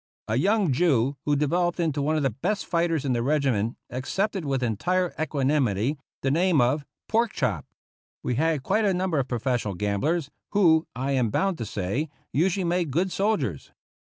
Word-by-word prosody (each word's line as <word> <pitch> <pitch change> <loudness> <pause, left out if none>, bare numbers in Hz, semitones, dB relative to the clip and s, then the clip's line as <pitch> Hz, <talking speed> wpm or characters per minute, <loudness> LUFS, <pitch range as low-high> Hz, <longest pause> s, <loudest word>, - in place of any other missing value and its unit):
A 110 - 0
young 195 - +2
Jew 140 -3 +2
who 145 - +2
developed 175 +5 +1
into 155 -4 0
one 155 +3 +1
of 150 - 0
the 135 - +2
best 190 - -2
fighters 170 -4 0
in 130 - +1
the 120 - 0
regiment 130 -5 +1
accepted, 190 - -2
with 135 -2 -1
entire 175 - 0
equanimity, 140 -4 +1 0.2
the 135 - +2
name 170 +1 +3
of 130 +5 +2
" - - -65
Pork 230 +1 +1
chop." - - -1 0.6
We - - -1
had 155 +1 +1
quite 220 - +1
a 195 -3 +2
number 180 -4 0
of 135 - -1
professional 120 -4 -1
gamblers, 135 - -1 0.2
who, 165 -5 +4
I 135 +3 -2
am 125 -4 +2
bound 190 - 0
to 115 - -3
say, 105 - -2 0.2
usually 185 +5 +2
made 175 -1 0
good 175 +7 0
soldiers. 175 - -1
150 Hz, 180 wpm, -26 LUFS, 125-175 Hz, 0.6 s, who